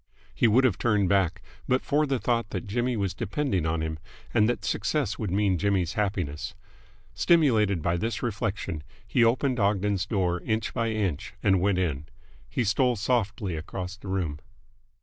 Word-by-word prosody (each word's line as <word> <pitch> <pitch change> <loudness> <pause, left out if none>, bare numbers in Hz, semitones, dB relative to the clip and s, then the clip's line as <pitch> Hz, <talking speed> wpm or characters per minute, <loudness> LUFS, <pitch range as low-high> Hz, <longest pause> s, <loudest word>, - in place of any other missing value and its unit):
He 120 - +3
would 120 +5 +4
have 120 -8 +2
turned 105 -5 +2
back, 95 -4 +1 0.2
but 130 +1 +2
for 150 +1 +2
the 135 -1 +1
thought 115 -2 0
that 95 - -4
Jimmy 120 +4 -1
was 100 -4 -1
depending 95 - -1
on 80 0 0
him 80 -1 -4 0.3
and 110 0 +4
that 110 -3 -2
success 105 +3 -1
would 105 - -2
mean 95 -1 +1
Jimmy's 95 -4 +1
happiness. 95 -8 -2 0.6
Stimulated 110 - +3
by 85 +1 +1
this 115 +6 -2
reflection, 100 -7 -2 0.2
he 120 - +2
opened 125 +2 +2
Ogden's 100 -1 +1
door 90 -4 0
inch 110 -1 -1
by 115 -2 0
inch 100 -9 -2
and 95 -2 +4
went 100 -1 +2
in. 75 -5 -1 0.4
He 125 - 0
stole 125 +4 +2
softly 105 -4 -1
across 90 +4 -5
the 105 0 -12
room. 90 -6 -2
100 Hz, 170 wpm, -27 LUFS, 90-115 Hz, 0.6 s, would